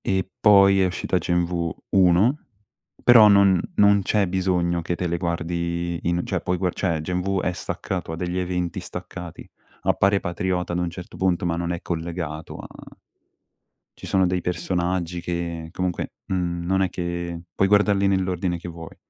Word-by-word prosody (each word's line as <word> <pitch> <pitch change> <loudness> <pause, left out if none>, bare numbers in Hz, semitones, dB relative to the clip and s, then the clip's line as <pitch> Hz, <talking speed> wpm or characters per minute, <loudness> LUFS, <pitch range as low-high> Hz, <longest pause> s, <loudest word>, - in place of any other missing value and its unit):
E 95 -1 0
poi 100 -2 +6
è - - +4
uscita 90 0 -1
Gen 85 0 +1
V 85 -1 -2 0.2
1, 95 - +4 0.6
però 115 -3 +8
non 100 -3 +5
non 100 0 +5
c'è 100 +1 +1
bisogno 90 -2 0
che 85 +1 -2
te 90 - -3
le 85 0 -1
guardi 85 0 -2
in 85 +1 0
cioè - - -2
puoi 90 0 -1
gua 90 0 0
cioè, 85 -5 -1
Gen 90 +3 -2
V 95 +1 0
è 90 - 0
staccato, 85 - -4
ha - - -3
degli 90 +2 -3
eventi 90 -1 -2
staccati. 85 -1 -8 0.4
Appare 100 0 +3
Patriota 90 0 -2
ad 85 - 0
un 90 -1 -1
certo 90 +1 -10
punto, 90 -2 +1
ma 85 -1 0
non 85 0 -2
è 85 - -4
collegato 80 -2 -5
a - - -9 1.3
ci - - -11
sono 95 -1 +2
dei 90 0 0
personaggi 90 0 -1
che 85 -1 -4
comunque, 90 -1 -3
mhmm, 85 -2 -2
non 95 +2 +1
è 95 - +2
che 85 -1 -4 0.2
puoi 95 - +2
guardarli 100 -1 +3
nell'ordine 95 -2 0
che 85 - -8
vuoi. 85 -1 -10
90 Hz, 175 wpm, -23 LUFS, 85-95 Hz, 1.3 s, però